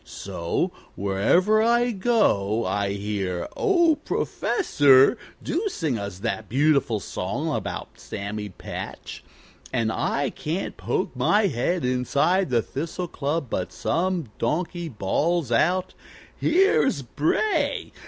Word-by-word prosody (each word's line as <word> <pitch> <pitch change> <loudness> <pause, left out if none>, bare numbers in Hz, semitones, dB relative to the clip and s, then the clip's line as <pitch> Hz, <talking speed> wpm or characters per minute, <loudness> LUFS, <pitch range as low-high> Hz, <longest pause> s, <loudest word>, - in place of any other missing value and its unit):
So 85 0 -3 0.2
wherever 140 - +3
I 240 +2 +3
go 150 - +1
I 100 -1 0
hear, 100 -3 -3
'Oh, 345 -5 +3
Professor, 140 - +3 0.3
do 365 +8 -1
sing 155 - -2
us 100 -3 -5
that 110 0 -3
beautiful 140 -4 +2
song 140 - -3
about - - -5
Sammy 105 +1 -5
Patch.' 95 - -8 0.5
And 115 -3 0
I 140 +4 -1
can't 165 +6 -4
poke - - -2
my 210 0 +3
head 170 +1 0
inside 140 +9 +1
the 120 -3 +2
Thistle 165 +5 -4
Club 145 +1 -2
but 90 -5 -3
some 175 - -1
donkey 170 +1 -1
bawls 145 - 0
out, 180 +10 +2 0.4
'Here's 325 - +3
Bray! 160 - 0
145 Hz, 115 wpm, -24 LUFS, -, 0.5 s, wherever